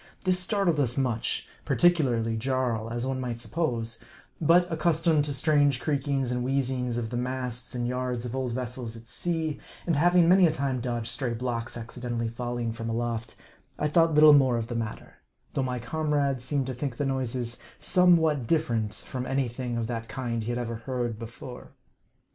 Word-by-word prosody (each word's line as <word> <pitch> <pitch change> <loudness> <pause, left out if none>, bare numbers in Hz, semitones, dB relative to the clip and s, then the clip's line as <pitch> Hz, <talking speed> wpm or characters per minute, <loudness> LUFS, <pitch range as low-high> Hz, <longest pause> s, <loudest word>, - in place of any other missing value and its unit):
This 185 -1 +3
startled 185 -4 +1
us 125 -2 +1
much; 125 -4 -1 0.2
particularly 125 -10 +2
Jarl, 120 -2 -1
as 120 +1 -2
one 130 0 -2
might 120 -2 -3
suppose; 115 -6 -2 0.4
but 170 +3 +5
accustomed 160 -1 +2
to - - -4
the 140 - -1
strange 145 -2 +3
creakings 140 -3 0
and 125 0 -1
wheezings 130 -2 0
of 115 -2 -3
the 120 - -2
masts 125 -1 -3
and 120 -1 -1
yards 125 -1 -2
of 125 +1 -4
old 130 -2 -1
vessels 125 -1 -4
at 115 +1 -14
sea, 160 +3 -1 0.3
and 170 - +1
having 175 +3 +5
many 185 0 +7
a - - +2
time 135 -4 -1
dodged 120 -2 -2
stray 120 -3 -2
blocks 120 -1 -3
accidentally 115 0 -4
falling 120 0 -3
from 115 0 -5
aloft, 115 0 -2 0.4
I 150 - +1
thought 165 +1 +3
little 150 0 +9
more 130 -4 +5
of 115 0 -3
the 120 - -3
matter; 115 -2 -5 0.4
though - - 0
my 125 -1 -1
comrade 140 +1 0
seemed 135 +1 -1
to 130 - -3
think 125 -1 -4
the 145 - 0
noises 125 -3 -1 0.2
somewhat 160 -8 +4
different 115 -10 +1
from 130 +2 -5
any 135 -1 +1
thing 120 0 -4
of 115 - -1
that 115 0 -4
kind 120 -3 -2
he 110 - -4
had 120 - -1
ever 115 -2 -3
heard 120 -1 -3
before. 120 +2 -9
125 Hz, 185 wpm, -27 LUFS, 120-145 Hz, 0.4 s, little